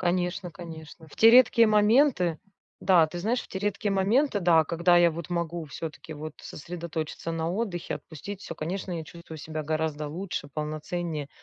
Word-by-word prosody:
Конечно, 180 Hz, 0 st, -1 dB
конечно. 160 Hz, -2 st, -10 dB
В -, -, -16 dB
те 225 Hz, -, +8 dB
редкие 235 Hz, -1 st, +7 dB
моменты 210 Hz, -, +4 dB, 0.4 s
Да, 175 Hz, -4 st, +5 dB
ты 175 Hz, +2 st, -6 dB
знаешь, 235 Hz, +6 st, 0 dB
в -, -, -10 dB
те 190 Hz, -, -6 dB
редкие 205 Hz, 0 st, -1 dB
моменты, 205 Hz, +4 st, +2 dB
да, 165 Hz, -2 st, +5 dB
когда 170 Hz, +2 st, +3 dB
я 175 Hz, -1 st, +5 dB
вот 170 Hz, 0 st, -7 dB
могу 170 Hz, -1 st, -2 dB
всё-таки 155 Hz, +2 st, -7 dB
вот 155 Hz, +1 st, -7 dB
сосредоточиться 165 Hz, 0 st, -6 dB
на 165 Hz, 0 st, -2 dB
отдыхе, 185 Hz, -2 st, -2 dB
отпустить 200 Hz, +5 st, -8 dB
всё, 165 Hz, -, -7 dB
конечно, 185 Hz, +4 st, -4 dB
я 160 Hz, -, -6 dB
чувствую 170 Hz, -1 st, -11 dB
себя 155 Hz, +1 st, -5 dB
гораздо 155 Hz, -1 st, -2 dB
лучше, 175 Hz, -2 st, -5 dB
полноценнее. 155 Hz, 0 st, -4 dB
170 Hz, 170 wpm, -27 LUFS, 160-195 Hz, 0.4 s, те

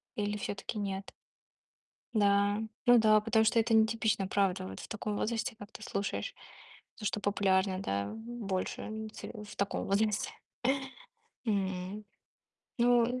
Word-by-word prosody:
или 205 Hz, 0 st, -1 dB
всё-таки 205 Hz, +1 st, -4 dB
нет? 195 Hz, -1 st, -3 dB, 1.0 s
Да. 205 Hz, 0 st, +4 dB, 0.3 s
Ну 245 Hz, -1 st, +8 dB
да, 215 Hz, -1 st, +6 dB
потому 220 Hz, 0 st, +3 dB
что 230 Hz, -, +3 dB
это 225 Hz, -, 0 dB
нетипично, 220 Hz, -2 st, +3 dB
правда. 190 Hz, -, +1 dB
Вот 95 Hz, 0 st, -7 dB
в -, -, -9 dB
таком 210 Hz, -1 st, -3 dB
возрасте, 230 Hz, +2 st, -1 dB
как 205 Hz, 0 st, -10 dB
ты -, -, -11 dB
слушаешь. 205 Hz, -, -2 dB, 0.6 s
То, 215 Hz, -, -9 dB
что 210 Hz, 0 st, 0 dB
популярно, 190 Hz, -2 st, +2 dB
да, 100 Hz, -, 0 dB
м, 100 Hz, -, -6 dB, 0.3 s
больше, 190 Hz, -1 st, -2 dB
м, 220 Hz, 0 st, -5 dB
те -, -, -8 dB
в 205 Hz, -, -10 dB
таком 200 Hz, -, -1 dB
возрасте. 210 Hz, +1 st, +1 dB, 1.2 s
Мгм. 195 Hz, -1 st, -1 dB, 0.7 s
Ну, 240 Hz, +1 st, +5 dB
э 250 Hz, +2 st, -1 dB
205 Hz, 145 wpm, -32 LUFS, 195-220 Hz, 1.2 s, Ну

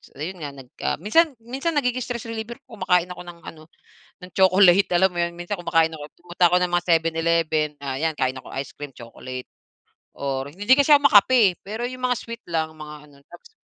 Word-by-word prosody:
ayun 175 Hz, +6 st, -6 dB
nag, 140 Hz, -4 st, -9 dB, 0.2 s
ah, -, -, +1 dB
minsan 315 Hz, +9 st, +3 dB
minsan 270 Hz, +8 st, -3 dB
nagiging 250 Hz, -3 st, 0 dB
stress 240 Hz, -2 st, -5 dB
reliever 230 Hz, +1 st, -5 dB
kumakain 180 Hz, -5 st, +1 dB
ako 180 Hz, -, -9 dB
ng 175 Hz, 0 st, -10 dB
ano, 155 Hz, -1 st, -11 dB, 0.5 s
ng 180 Hz, 0 st, -12 dB
chocolate 190 Hz, 0 st, +5 dB
alam 190 Hz, +2 st, +5 dB
mo 175 Hz, -, -1 dB
'yon 170 Hz, -, -2 dB
minsan 175 Hz, +4 st, -3 dB
kumakain 165 Hz, -1 st, +2 dB
ako 155 Hz, -2 st, -8 dB, 0.2 s
pumupunta 175 Hz, +1 st, 0 dB
ako 180 Hz, -, +5 dB
ng 180 Hz, -1 st, 0 dB
mga 175 Hz, 0 st, +2 dB
7/11 165 Hz, -1 st, +1 dB, 0.2 s
ah, 135 Hz, -1 st, -3 dB
'yan 160 Hz, -, +1 dB
kain 130 Hz, 0 st, 0 dB
ako 130 Hz, -, -10 dB
ice 135 Hz, -, -6 dB
cream, 145 Hz, -1 st, -8 dB
chocolate, 125 Hz, +2 st, -9 dB, 0.7 s
or 135 Hz, -1 st, -3 dB
hindi 205 Hz, +6 st, -9 dB
kasi 285 Hz, +1 st, +4 dB
ako 285 Hz, -, +5 dB
ma-kape 205 Hz, -3 st, +5 dB
pero 215 Hz, +4 st, -6 dB
'yong 255 Hz, 0 st, -8 dB
mga 250 Hz, 0 st, +2 dB
sweet 230 Hz, 0 st, -9 dB
lang 160 Hz, -2 st, -2 dB
mga 150 Hz, 0 st, -9 dB, 0.2 s
ano 140 Hz, -, -20 dB
tapos, 470 Hz, -, -16 dB
175 Hz, 200 wpm, -23 LUFS, 160-220 Hz, 0.7 s, chocolate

